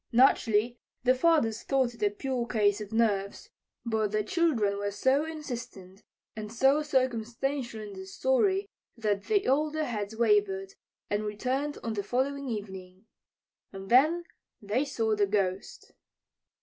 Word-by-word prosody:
Naturally, 235 Hz, -2 st, +3 dB, 0.2 s
the 255 Hz, 0 st, +5 dB
fathers 255 Hz, -6 st, +2 dB
thought 265 Hz, -3 st, +1 dB
it 230 Hz, -, -17 dB
a 205 Hz, -, +3 dB
pure 245 Hz, +3 st, -3 dB
case 210 Hz, -3 st, +2 dB
of 205 Hz, 0 st, -7 dB
nerves. 205 Hz, -3 st, 0 dB, 0.3 s
But 220 Hz, -3 st, 0 dB
the 215 Hz, 0 st, 0 dB
children 220 Hz, -, +1 dB
were 205 Hz, 0 st, -1 dB
so 260 Hz, +9 st, +1 dB
insistent 235 Hz, -11 st, -7 dB, 0.3 s
and 215 Hz, -1 st, -6 dB
so 270 Hz, +5 st, +3 dB
circumstantial 255 Hz, -2 st, -1 dB
in 210 Hz, -1 st, -8 dB
their 190 Hz, 0 st, -9 dB
story 380 Hz, -, +1 dB, 0.3 s
that 210 Hz, -3 st, -1 dB
the 410 Hz, -2 st, +1 dB
older 305 Hz, +3 st, +1 dB
heads 220 Hz, -5 st, -4 dB
wavered 205 Hz, -4 st, +1 dB, 0.4 s
and 205 Hz, +1 st, 0 dB
returned 255 Hz, +8 st, -2 dB
on 230 Hz, -, -2 dB
the 205 Hz, -, -2 dB
following 265 Hz, +5 st, -1 dB
evening. 190 Hz, -3 st, -7 dB, 0.7 s
And 195 Hz, +2 st, -9 dB
then 310 Hz, +8 st, +5 dB, 0.4 s
they 215 Hz, +7 st, -1 dB
saw 225 Hz, -6 st, 0 dB
the 205 Hz, -1 st, +2 dB
Ghost! 195 Hz, -2 st, -2 dB
225 Hz, 140 wpm, -29 LUFS, 205-270 Hz, 0.7 s, the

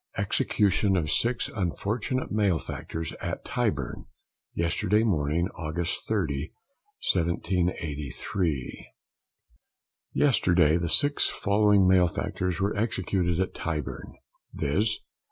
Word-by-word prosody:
EXECUTION 100 Hz, -1 st, +2 dB
OF 75 Hz, -4 st, -1 dB
Six 120 Hz, +1 st, +1 dB
Unfortunate 105 Hz, +7 st, -2 dB
Malefactors, 85 Hz, -5 st, -2 dB
AT -, -, -4 dB
TYBURN, -, -, -2 dB, 0.5 s
YESTERDAY 90 Hz, +6 st, +1 dB
MORNING, 85 Hz, -3 st, +1 dB
AUGUST 85 Hz, +1 st, -2 dB
30, 70 Hz, +2 st, -1 dB, 0.6 s
1783. 85 Hz, -3 st, -2 dB, 1.2 s
Yesterday 90 Hz, -, +3 dB
the 85 Hz, -1 st, -2 dB
six 145 Hz, -, +5 dB
following 100 Hz, -1 st, +3 dB
malefactors 90 Hz, 0 st, +1 dB
were 100 Hz, +1 st, 0 dB
executed 95 Hz, -5 st, 0 dB
at 95 Hz, -, -1 dB
Tyburn, 75 Hz, -4 st, -5 dB, 0.4 s
viz. 105 Hz, +10 st, 0 dB
90 Hz, 85 wpm, -27 LUFS, 80-100 Hz, 1.2 s, six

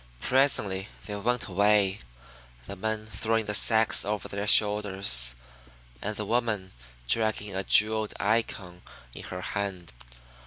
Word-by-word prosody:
Presently 105 Hz, -, +1 dB, 0.2 s
they 105 Hz, -, -6 dB
went 120 Hz, +4 st, -2 dB
away, 100 Hz, 0 st, +1 dB, 0.7 s
the 100 Hz, -, -8 dB
men 110 Hz, +2 st, -4 dB
throwing 110 Hz, +1 st, -2 dB
the 105 Hz, -, -3 dB
sacks 110 Hz, +1 st, +3 dB
over 105 Hz, +1 st, -4 dB
their 100 Hz, +1 st, -6 dB
shoulders, 100 Hz, -, +4 dB, 0.7 s
and 105 Hz, +1 st, -4 dB
the 105 Hz, -, -5 dB
woman 110 Hz, -4 st, -2 dB, 0.4 s
dragging 110 Hz, -, 0 dB
a 95 Hz, +1 st, -3 dB
jeweled 110 Hz, +1 st, +4 dB
Icon 100 Hz, -5 st, -3 dB, 0.3 s
in -, -, -10 dB
her -, -, -8 dB
hand. 95 Hz, -7 st, -5 dB
105 Hz, 125 wpm, -26 LUFS, 95-110 Hz, 0.7 s, shoulders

